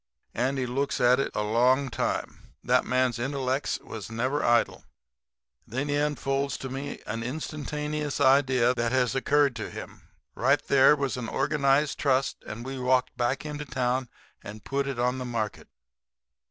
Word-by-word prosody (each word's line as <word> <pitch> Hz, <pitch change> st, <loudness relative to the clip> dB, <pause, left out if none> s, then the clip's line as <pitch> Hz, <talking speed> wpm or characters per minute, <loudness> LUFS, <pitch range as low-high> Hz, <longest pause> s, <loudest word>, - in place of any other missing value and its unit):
Andy 130 Hz, +2 st, 0 dB
looks 140 Hz, +3 st, -1 dB
at 125 Hz, +1 st, +5 dB
it 140 Hz, -, 0 dB
a 105 Hz, -, 0 dB
long 125 Hz, +6 st, +3 dB
time. -, -, -3 dB
That -, -, +3 dB
man's 125 Hz, -2 st, +1 dB
intellects 135 Hz, +1 st, -1 dB
was 110 Hz, -3 st, -8 dB
never 130 Hz, +6 st, -1 dB
idle. 120 Hz, 0 st, +2 dB, 0.8 s
And -, -, -17 dB
then 145 Hz, +3 st, -1 dB
he 145 Hz, -, +1 dB
unfolds 140 Hz, -1 st, 0 dB
to 135 Hz, -, -6 dB
me 135 Hz, +2 st, -5 dB
a -, -, -4 dB
instantaneous 150 Hz, +3 st, -3 dB
idea 130 Hz, -3 st, +4 dB
that 115 Hz, -2 st, -1 dB
has 125 Hz, -2 st, +2 dB
occurred 140 Hz, 0 st, +2 dB
to -, -, -5 dB
him. -, -, -10 dB, 0.3 s
Right -, -, +3 dB
there 135 Hz, +2 st, +6 dB
was 140 Hz, -3 st, -2 dB
organized 140 Hz, +4 st, +1 dB
a -, -, -5 dB
trust; 135 Hz, -2 st, +1 dB
and 115 Hz, +3 st, -7 dB
we 135 Hz, 0 st, -5 dB
walked 125 Hz, 0 st, +1 dB
back 125 Hz, +4 st, -1 dB
into 150 Hz, -1 st, -4 dB
town 130 Hz, -1 st, -1 dB, 0.3 s
and 105 Hz, 0 st, -9 dB
put 140 Hz, 0 st, -1 dB
it 135 Hz, -3 st, -3 dB
on 125 Hz, +2 st, 0 dB
the -, -, -3 dB
market. 115 Hz, -4 st, -4 dB
130 Hz, 165 wpm, -27 LUFS, 125-140 Hz, 0.8 s, there